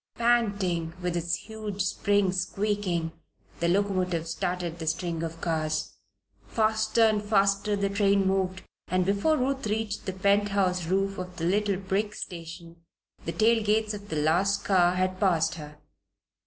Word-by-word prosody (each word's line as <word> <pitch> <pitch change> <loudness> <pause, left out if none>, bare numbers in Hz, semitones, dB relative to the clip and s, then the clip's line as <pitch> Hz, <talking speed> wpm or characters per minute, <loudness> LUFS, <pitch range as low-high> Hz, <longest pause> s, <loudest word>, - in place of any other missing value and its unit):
Panting, 200 -8 +1
with 180 -1 -2
its 170 0 0
huge 215 -3 -5
springs 200 -2 +1
squeaking, 190 -4 -1 0.5
the 170 - +1
locomotive 185 -3 0
started 175 -1 -3
the 160 - -5
string 165 0 -1
of 165 0 -5
cars. 155 -2 -1 0.5
Faster 220 +1 +2
and 215 -2 +3
faster 200 0 +2
the 200 0 0
train 200 0 +2
moved, 190 -1 0 0.2
and 185 0 +1
before 200 - +2
Ruth 265 -2 -1
reached 215 -1 -2
the 190 - -1
pent 200 +2 +2
house 185 -4 0
roof 195 +2 0
of 180 0 -6
the 165 - -3
little 200 +2 +1
brick 195 +2 -2
station, 170 -1 -8 0.5
the 165 - -2
tail 220 +6 +3
lights 215 0 +1
of 205 0 -8
the 160 - -3
last 170 +7 +1
car 180 -2 +4
had 185 0 -1
passed 170 -5 +2
her. 150 -2 -9
190 Hz, 155 wpm, -27 LUFS, 175-205 Hz, 0.5 s, car